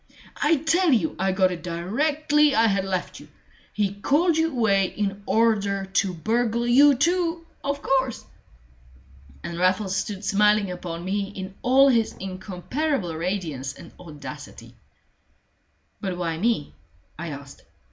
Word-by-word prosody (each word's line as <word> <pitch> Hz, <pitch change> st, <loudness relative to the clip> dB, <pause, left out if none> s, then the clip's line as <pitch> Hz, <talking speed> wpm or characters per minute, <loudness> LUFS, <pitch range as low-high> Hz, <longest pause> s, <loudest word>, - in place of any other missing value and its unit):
"I 310 Hz, +3 st, +4 dB
tell 325 Hz, +3 st, +2 dB
you 215 Hz, -11 st, +1 dB
I 190 Hz, +1 st, +1 dB
got 185 Hz, -1 st, +2 dB
it 175 Hz, -, -5 dB
directly 290 Hz, -, +1 dB
I 225 Hz, -, +4 dB
had 195 Hz, -3 st, +1 dB
left 185 Hz, -2 st, -3 dB
you. -, -, -14 dB, 0.4 s
He 205 Hz, -2 st, -1 dB
called 300 Hz, -, +2 dB
you 320 Hz, +1 st, +2 dB
away 205 Hz, -6 st, +2 dB
in 200 Hz, 0 st, -3 dB
order 205 Hz, -3 st, +1 dB
to 190 Hz, 0 st, 0 dB
burgle 230 Hz, +6 st, 0 dB
you 275 Hz, +4 st, +6 dB
too, 335 Hz, +3 st, 0 dB, 0.2 s
of 280 Hz, 0 st, -3 dB
course!" 265 Hz, -3 st, 0 dB, 1.2 s
And 170 Hz, 0 st, -5 dB
Raffles 190 Hz, +1 st, +1 dB
stood 205 Hz, 0 st, -3 dB
smiling 210 Hz, -1 st, +3 dB
upon 175 Hz, -1 st, -6 dB
me 200 Hz, +1 st, -1 dB
in 190 Hz, 0 st, -6 dB
all 265 Hz, +2 st, +5 dB
his 235 Hz, -4 st, +2 dB
incomparable 190 Hz, -, -3 dB
radiance 160 Hz, -6 st, -3 dB
and 170 Hz, -, -13 dB
audacity. 155 Hz, -5 st, -10 dB, 1.3 s
"But 190 Hz, -4 st, -3 dB
why 165 Hz, -2 st, -2 dB
me?" 220 Hz, -, 0 dB, 0.5 s
I 170 Hz, -, -4 dB
asked. 140 Hz, -1 st, -9 dB
205 Hz, 135 wpm, -24 LUFS, 185-265 Hz, 1.3 s, you